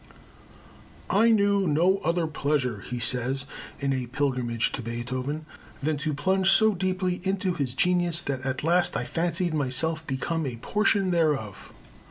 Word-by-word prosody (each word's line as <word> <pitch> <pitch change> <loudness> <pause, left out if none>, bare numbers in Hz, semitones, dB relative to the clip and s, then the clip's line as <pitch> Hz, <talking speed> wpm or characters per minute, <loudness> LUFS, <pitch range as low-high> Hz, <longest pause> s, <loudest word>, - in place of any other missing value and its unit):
"I 225 +4 +4
knew 200 -3 +3
no 175 +6 +3
other 170 -2 0
pleasure," 140 -7 -1
he 125 +5 -6
says 125 +3 +1 0.3
in 140 -1 0
A 130 -2 -2
Pilgrimage 125 -3 -1
to 135 - -4
Beethoven, 125 +6 -4 0.3
"than 150 +1 -1
to 150 0 -2
plunge 190 +6 +2
so 220 +2 +5
deeply 185 -1 -1
into 190 -1 0
his 135 -6 -3
genius 175 -1 +2
that 135 -2 -3
at 130 +1 -3
last 175 +2 +2
I - - -2
fancied 175 0 -1
myself 155 +3 -1
become 155 +3 -2
a 125 - -4
portion 200 - +1
thereof." 150 - -1
155 Hz, 150 wpm, -26 LUFS, 130-180 Hz, 0.3 s, so